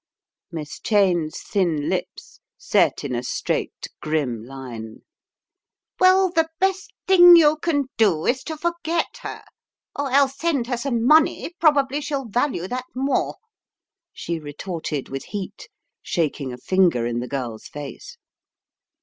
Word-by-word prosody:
Miss 155 Hz, -3 st, -7 dB
Cheyne's 180 Hz, -7 st, +1 dB
thin 170 Hz, -7 st, 0 dB
lips -, -, -4 dB, 0.2 s
set -, -, +1 dB
in 140 Hz, -3 st, -3 dB
a 120 Hz, -, -1 dB
straight, 125 Hz, -, -3 dB, 0.2 s
grim 140 Hz, -8 st, -1 dB
line. 120 Hz, -4 st, -9 dB, 1.0 s
"Well, 370 Hz, 0 st, +5 dB
the 325 Hz, -2 st, +1 dB
best 385 Hz, +1 st, 0 dB, 0.2 s
thing 355 Hz, -2 st, +9 dB
you 310 Hz, -2 st, +5 dB
can 300 Hz, -3 st, 0 dB
do 190 Hz, -8 st, +3 dB
is 260 Hz, +1 st, +1 dB
to 315 Hz, -1 st, -5 dB
forget 340 Hz, 0 st, -2 dB
her, -, -, -7 dB, 0.5 s
or 285 Hz, -2 st, -2 dB
else 275 Hz, 0 st, +3 dB
send 310 Hz, -8 st, 0 dB
her 245 Hz, 0 st, -2 dB
some 235 Hz, -2 st, -1 dB
money, 310 Hz, +4 st, +4 dB
probably 290 Hz, -3 st, +3 dB
she'll 280 Hz, -2 st, -3 dB
Talue 235 Hz, -4 st, -1 dB
that 250 Hz, +4 st, -4 dB
more," 270 Hz, +2 st, 0 dB, 0.8 s
she 170 Hz, -1 st, -4 dB
retorted 155 Hz, -1 st, -5 dB
with 135 Hz, 0 st, -6 dB
heat, 205 Hz, 0 st, -7 dB, 0.3 s
shaking 150 Hz, -5 st, -2 dB
a 125 Hz, -, -7 dB
finger 170 Hz, -4 st, +2 dB
in 120 Hz, 0 st, -2 dB
the 125 Hz, -, -4 dB
girl's 120 Hz, -5 st, -5 dB
face. 145 Hz, -, -9 dB
220 Hz, 135 wpm, -22 LUFS, -, 1.0 s, thing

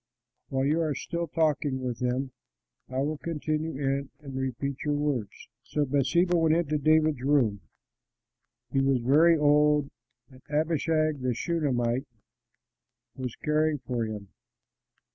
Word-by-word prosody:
While 135 Hz, -1 st, 0 dB
you 155 Hz, +4 st, +2 dB
are 155 Hz, -3 st, 0 dB
still 170 Hz, +4 st, -3 dB
talking 150 Hz, -3 st, 0 dB
with 125 Hz, -3 st, -4 dB
him, 125 Hz, +2 st, -1 dB, 0.6 s
I 130 Hz, +1 st, -1 dB
will 150 Hz, +1 st, -2 dB
come 165 Hz, -3 st, -4 dB
in 140 Hz, -3 st, -1 dB
and 140 Hz, -3 st, -9 dB
repeat 130 Hz, +1 st, -3 dB
your 150 Hz, -1 st, 0 dB
words." 140 Hz, -8 st, -2 dB
So 145 Hz, +3 st, -1 dB
Bathsheba 145 Hz, +7 st, +2 dB
went 160 Hz, -1 st, +3 dB
into 155 Hz, -3 st, 0 dB
David's 155 Hz, -2 st, +3 dB
room; 130 Hz, -8 st, +2 dB, 1.1 s
he 135 Hz, -, +2 dB
was 135 Hz, -1 st, +3 dB
very 155 Hz, +7 st, +5 dB
old, 150 Hz, -1 st, +3 dB, 0.4 s
and 130 Hz, 0 st, -16 dB
Abishag 155 Hz, -1 st, +1 dB
the 125 Hz, -2 st, 0 dB
Shunamite 130 Hz, -5 st, 0 dB, 1.1 s
was 130 Hz, -3 st, -5 dB
caring 155 Hz, 0 st, +1 dB
for 125 Hz, -3 st, -3 dB
him. 105 Hz, -3 st, -6 dB
145 Hz, 130 wpm, -28 LUFS, 130-155 Hz, 1.1 s, very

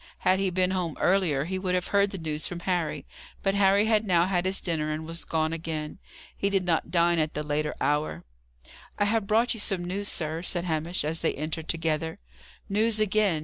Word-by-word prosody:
Had 185 Hz, +1 st, +3 dB
he 195 Hz, -1 st, +1 dB
been 185 Hz, 0 st, +1 dB
home 180 Hz, -4 st, -2 dB
earlier, 175 Hz, -7 st, +2 dB
he 185 Hz, +2 st, -2 dB
would 185 Hz, -1 st, 0 dB
have 180 Hz, -, -1 dB
heard 200 Hz, 0 st, +3 dB
the 195 Hz, -, -5 dB
news 155 Hz, -2 st, -3 dB
from 175 Hz, -1 st, -6 dB
Harry. 175 Hz, -4 st, -1 dB, 0.4 s
But 195 Hz, -, +2 dB
Harry 200 Hz, +1 st, +4 dB
had 220 Hz, -1 st, +3 dB
now 175 Hz, -4 st, +3 dB
had 180 Hz, -1 st, 0 dB
his 190 Hz, +1 st, +3 dB
dinner 160 Hz, -3 st, -1 dB
and 155 Hz, +1 st, -4 dB
was 165 Hz, +1 st, -5 dB
gone 160 Hz, 0 st, 0 dB
again. 160 Hz, -2 st, -4 dB, 0.4 s
He 200 Hz, -, 0 dB
did 195 Hz, -2 st, +1 dB
not 165 Hz, -2 st, +1 dB
dine 170 Hz, -1 st, +3 dB
at 155 Hz, 0 st, -1 dB
the 150 Hz, -, -1 dB
later 150 Hz, 0 st, -1 dB
hour. 150 Hz, +1 st, 0 dB, 0.7 s
"I 205 Hz, -, +2 dB
have 215 Hz, -1 st, +1 dB
brought 230 Hz, +4 st, +3 dB
you 225 Hz, -, -7 dB
some 190 Hz, -3 st, -1 dB
news, 200 Hz, +3 st, -3 dB
sir," 160 Hz, -2 st, -2 dB
said 175 Hz, 0 st, -2 dB
Hamish, 165 Hz, +1 st, 0 dB
as 160 Hz, +2 st, -1 dB
they 165 Hz, -, 0 dB
entered 155 Hz, +2 st, -4 dB
together. 160 Hz, -1 st, -1 dB, 0.5 s
"News 215 Hz, +2 st, +1 dB
again! 210 Hz, -5 st, +2 dB
175 Hz, 210 wpm, -27 LUFS, 160-195 Hz, 0.7 s, Harry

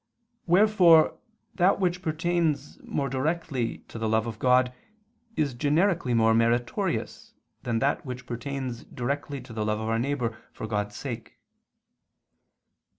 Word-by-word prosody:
Wherefore 180 Hz, -4 st, +5 dB, 0.3 s
that 190 Hz, 0 st, +3 dB
which 180 Hz, -1 st, 0 dB
pertains 160 Hz, -3 st, -1 dB
more 140 Hz, -, -2 dB
directly 135 Hz, -2 st, -2 dB
to 115 Hz, -, -7 dB
the 110 Hz, -1 st, -1 dB
love 110 Hz, 0 st, +2 dB
of 115 Hz, -2 st, -6 dB
God 125 Hz, 0 st, +3 dB, 0.6 s
is 145 Hz, -4 st, +1 dB
generically 150 Hz, 0 st, +1 dB
more 115 Hz, 0 st, +4 dB
meritorious 160 Hz, -, 0 dB, 0.3 s
than 120 Hz, -2 st, -1 dB
that 140 Hz, +5 st, +1 dB
which 125 Hz, -2 st, -7 dB
pertains 125 Hz, 0 st, -4 dB
directly 140 Hz, +2 st, -4 dB
to 125 Hz, -2 st, -11 dB
the 110 Hz, -1 st, -2 dB
love 105 Hz, 0 st, 0 dB
of 110 Hz, 0 st, -3 dB
our 115 Hz, 0 st, +1 dB
neighbor 125 Hz, -3 st, -1 dB, 0.2 s
for -, -, -6 dB
God's 105 Hz, -1 st, -2 dB
sake. 120 Hz, -5 st, -6 dB
130 Hz, 135 wpm, -27 LUFS, 115-160 Hz, 0.6 s, Wherefore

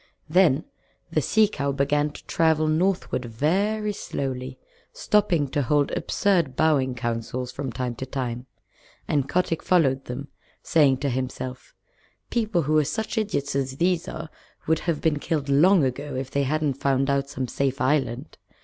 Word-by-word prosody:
Then 160 Hz, -4 st, +3 dB, 0.5 s
the -, -, +2 dB
Sea 220 Hz, -1 st, +4 dB
Cow 140 Hz, -8 st, -2 dB
began 145 Hz, +2 st, +1 dB
to 145 Hz, -, -13 dB
travel 160 Hz, -1 st, +2 dB
northward 165 Hz, -5 st, 0 dB
very 200 Hz, -, 0 dB
slowly, 130 Hz, -6 st, -4 dB, 0.3 s
stopping 185 Hz, -8 st, +1 dB
to 145 Hz, -, 0 dB
hold 145 Hz, +2 st, +2 dB
absurd 175 Hz, -10 st, +1 dB
bowing 140 Hz, -5 st, +2 dB
councils 120 Hz, +1 st, -3 dB
from 135 Hz, -1 st, -4 dB
time 125 Hz, 0 st, -3 dB
to 130 Hz, -, -5 dB
time, 125 Hz, -1 st, -4 dB, 0.6 s
and 140 Hz, -3 st, 0 dB
Kotick 170 Hz, -2 st, 0 dB
followed 135 Hz, -7 st, +2 dB
them, 130 Hz, +3 st, -6 dB, 0.3 s
saying 145 Hz, -6 st, +4 dB
to 140 Hz, -, 0 dB
himself, 130 Hz, 0 st, -5 dB, 0.6 s
"People 215 Hz, -7 st, +1 dB
who 155 Hz, +2 st, +3 dB
are -, -, +3 dB
such 210 Hz, +11 st, -3 dB
idiots 200 Hz, -12 st, -1 dB
as 135 Hz, -1 st, -2 dB
these 175 Hz, +1 st, +1 dB
are 160 Hz, 0 st, -6 dB, 0.3 s
would 160 Hz, 0 st, +2 dB
have 165 Hz, -4 st, -2 dB
been 155 Hz, -2 st, +1 dB
killed 145 Hz, -2 st, -2 dB
long 165 Hz, +5 st, +5 dB
ago 135 Hz, +2 st, -2 dB
if 130 Hz, 0 st, -4 dB
they 140 Hz, 0 st, +1 dB
hadn't 145 Hz, -1 st, -1 dB
found 135 Hz, -1 st, +2 dB
out 140 Hz, 0 st, 0 dB
some 130 Hz, -2 st, -3 dB
safe 135 Hz, +2 st, -1 dB
island. 130 Hz, 0 st, -1 dB
140 Hz, 160 wpm, -25 LUFS, 130-165 Hz, 0.6 s, long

